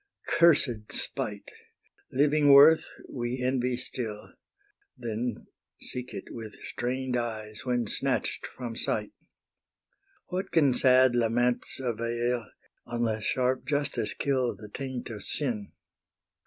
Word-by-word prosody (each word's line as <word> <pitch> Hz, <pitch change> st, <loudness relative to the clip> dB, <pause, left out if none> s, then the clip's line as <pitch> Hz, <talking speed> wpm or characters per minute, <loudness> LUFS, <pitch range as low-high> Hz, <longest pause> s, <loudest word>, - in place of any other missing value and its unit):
cursed 135 Hz, -10 st, +3 dB
spite! 105 Hz, -1 st, -4 dB, 0.6 s
Living 145 Hz, +2 st, +4 dB
worth 145 Hz, +4 st, +8 dB, 0.2 s
we 125 Hz, 0 st, -3 dB
envy 125 Hz, -1 st, 0 dB
still, 110 Hz, -4 st, -6 dB, 0.6 s
Then 120 Hz, -1 st, -3 dB, 0.3 s
seek 125 Hz, 0 st, -3 dB
it -, -, -7 dB
with 110 Hz, -3 st, -8 dB
strain'd 130 Hz, +1 st, -2 dB
eyes, 110 Hz, -2 st, -4 dB
when 120 Hz, -1 st, +1 dB
snatch'd -, -, -1 dB
from 120 Hz, -3 st, -7 dB
sight. -, -, -1 dB, 1.2 s
What 185 Hz, +1 st, -3 dB
can 145 Hz, -5 st, +4 dB
sad 130 Hz, 0 st, +5 dB
laments 120 Hz, +2 st, +1 dB
avail 120 Hz, -1 st, -1 dB, 0.4 s
Unless 115 Hz, -3 st, -1 dB
sharp 130 Hz, 0 st, 0 dB
justice 145 Hz, -6 st, -1 dB
kill 130 Hz, -3 st, 0 dB
the 105 Hz, -1 st, -11 dB
taint 130 Hz, +1 st, -5 dB
of 105 Hz, -2 st, -7 dB
sin? 120 Hz, -8 st, -2 dB
125 Hz, 110 wpm, -28 LUFS, 115-130 Hz, 1.2 s, worth